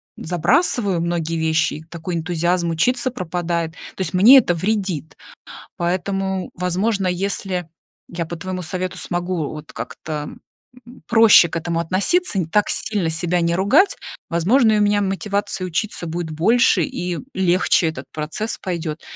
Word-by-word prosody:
забрасываю 185 - +1
многие 165 -1 -2
вещи, 160 -1 +1
и 155 - -9
такой 170 +1 -5
энтузиазм 170 +1 0
учиться 245 +10 +1
пропадает. 170 -5 -3 0.2
То - - -6
есть 180 -1 -2
мне 220 +9 +8
это 215 -8 +4
вредит, 185 -3 -2 0.6
поэтому, 190 +2 -2
возможно, 190 +3 0
если 180 -1 -2 0.4
я 170 -1 -4
по 170 +1 -6
твоему 185 +2 -5
совету 185 +2 -4
смогу 175 -3 -2
вот 155 0 -9
как-то 150 -2 -6 0.8
проще 225 -6 +7
к - - -6
этому 165 0 -2
относиться, 200 - 0
не 180 - +1
так 210 +5 +1
сильно 200 -6 0
себя 175 +2 0
не 170 0 +1
ругать, 205 - +3 0.3
возможно, 215 +7 +3
у - - +2
меня 205 0 +3
мотивация 200 -1 -2
учиться 180 +1 -3
будет 165 0 -4
больше 185 +3 +3
и 175 +3 -4 0.2
легче 185 -2 +2
этот 160 - -6
процесс 160 +9 -3
пойдет. 165 -4 -4
180 Hz, 140 wpm, -20 LUFS, 165-200 Hz, 0.8 s, мне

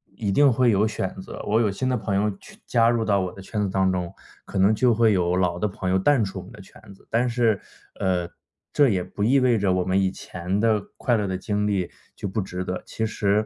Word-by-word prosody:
一 105 -3 -2
定 140 +7 +5
会 120 0 +3
有 105 +2 +3
选 95 -3 -3
择。 - - -9
我 110 +3 +2
有 105 - +2
新 130 +7 -3
的 125 - +1
朋 105 -3 -2
友 105 +2 +1
去 - - -15
加 115 -1 +3
入 115 -2 +1
到 100 -2 +2
我 90 - -3
的 - - -13
圈 105 +2 -4
子 100 - 0
当 95 0 +2
中， 90 -1 -3 0.3
可 - - -6
能 100 +3 +4
就 120 0 +3
会 115 -2 +4
有 90 -1 +1
老 90 -1 0
的 105 - +1
朋 95 -2 -3
友 95 - +3
淡 125 +1 +3
出 95 0 -6
我 - - -8
们 95 - -14
的 110 - -13
圈 95 - -17
子。 - - -25
但 120 +2 +2
是， 115 -4 +1 0.4
呃， 90 -2 0 0.5
这 145 -2 +4
也 95 -4 0
不 100 - -5
意 135 +5 +4
味 125 -4 +3
着 95 -2 +1
我 90 -1 +1
们 95 +2 +1
以 95 - +2
前 90 +2 -4
的 110 -2 +2 0.2
快 120 -2 +1
乐 105 -2 -1
的 95 -1 -2
经 105 +2 -1
历 95 -3 -1 0.2
就 - - -5
不 105 +3 -1
值 90 -1 -5
得。 90 0 -4
其 110 - -3
实， 105 -1 +1
100 Hz, 280 characters per minute, -24 LUFS, 95-115 Hz, 0.5 s, 定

